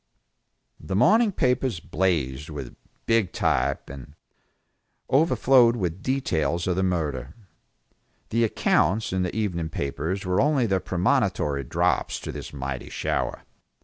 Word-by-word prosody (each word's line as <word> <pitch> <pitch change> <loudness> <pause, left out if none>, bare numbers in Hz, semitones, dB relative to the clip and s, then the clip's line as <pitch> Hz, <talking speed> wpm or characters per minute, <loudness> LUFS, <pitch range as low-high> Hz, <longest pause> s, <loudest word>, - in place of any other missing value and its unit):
The 95 - -4
morning 215 - +4
papers 125 - 0
blazed 80 -6 -1
with 70 -5 -7 0.3
big 115 -5 +2
type, - - 0
and 70 +1 -10 1.0
overflowed 130 -5 +4
with 90 -4 -3
details 85 - 0
of 90 - 0
the 95 - 0
murder. 75 -7 -2 0.9
The 115 +1 +1
accounts 105 -1 +1
in 95 - 0
the 90 -1 -2
evening 90 -7 -2
papers 80 +7 -3
were 90 +1 +2
only 140 -3 +2
the 95 -3 +1
premonitory 90 - 0
drops - - 0
to - - -5
this - - -7
mighty 65 -2 -5
shower. - - -2
90 Hz, 125 wpm, -25 LUFS, 75-115 Hz, 1.0 s, morning